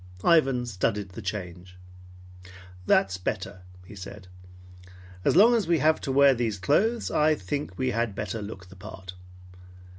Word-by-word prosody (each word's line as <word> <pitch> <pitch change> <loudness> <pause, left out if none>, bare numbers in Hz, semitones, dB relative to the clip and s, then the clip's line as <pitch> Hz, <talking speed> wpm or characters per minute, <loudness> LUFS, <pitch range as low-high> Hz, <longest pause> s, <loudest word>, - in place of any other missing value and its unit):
Ivan 135 -7 +3
studied 100 -2 -2
the 95 +5 -9
change. 90 -2 -6 1.1
"That's 95 -1 +3
better," 95 0 -4 0.2
he 100 - -12
said. 95 0 -10 1.0
"As - - +2
long 220 +7 +7
as 220 -7 +1
we 170 -1 +3
have 155 +1 +2
to 135 - -3
wear 140 0 +6
these 115 -4 -2
clothes, 215 - +1
I 155 +1 +3
think 140 +7 -5
we 130 -1 0
had 115 -4 -1
better 105 +1 -4
look 95 -3 -9
the 95 - -14
part. 95 -2 -10
105 Hz, 150 wpm, -26 LUFS, 95-140 Hz, 1.1 s, long